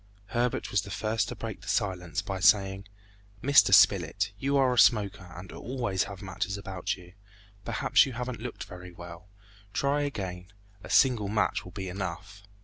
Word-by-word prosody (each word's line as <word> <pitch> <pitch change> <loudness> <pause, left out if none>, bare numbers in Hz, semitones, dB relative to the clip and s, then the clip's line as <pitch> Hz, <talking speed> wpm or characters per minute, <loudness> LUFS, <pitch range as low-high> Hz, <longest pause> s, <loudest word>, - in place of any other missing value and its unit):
Herbert 120 0 -1
was 100 - +2
the 100 - -10
first 110 +2 -1
to - - -6
break - - -6
the - - -14
silence 90 -4 -1
by 95 -1 -4
saying, 95 0 +3 0.6
"Mr. 140 -7 +6
Spilett, 100 0 +4
you 140 +3 +1
are 130 -2 +3
a 125 - +2
smoker 100 -5 +3
and 90 +1 -9
always 115 -7 -2
have 100 0 -9
matches 100 +1 -3
about 95 -2 -4
you; 90 -1 -15 0.5
perhaps - - +3
you 130 - -6
haven't 125 -1 -5
looked 125 0 -6 0.3
well, 85 +1 -10 0.5
try 140 +6 +1
again, 95 -10 -4 0.4
a - - -10
single 120 -6 +4
match 105 +2 0
will 90 - -11
be 95 0 -6
enough!" 95 +2 -6
100 Hz, 165 wpm, -28 LUFS, 95-120 Hz, 0.6 s, Mr